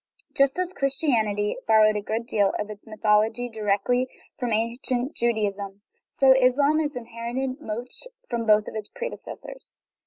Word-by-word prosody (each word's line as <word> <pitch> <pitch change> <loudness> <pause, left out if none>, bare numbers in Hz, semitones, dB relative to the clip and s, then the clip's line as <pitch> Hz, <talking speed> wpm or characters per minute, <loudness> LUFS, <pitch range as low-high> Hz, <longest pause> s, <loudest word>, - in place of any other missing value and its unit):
Just 275 +1 +3
as 365 0 -1
Christianity 235 - 0
borrowed 215 -1 +5
a 210 - -1
good 220 +3 -3
deal 205 -4 +1
of 210 0 -4
its 210 +1 -12
my 215 - -8
thology 220 +3 +2
directly 220 +4 +1 0.3
from 245 -2 -1
ancient 240 +5 -1
Judaism, 205 -4 -1 0.3
so 270 -1 +4
Islam 275 +4 +3
has 300 -3 -1
inherited 245 +3 -4
much 240 - -6 0.2
from 235 -2 -2
both 215 0 +6
its 215 -1 -6
predecessors. - - -8
235 Hz, 145 wpm, -25 LUFS, 215-265 Hz, 0.3 s, both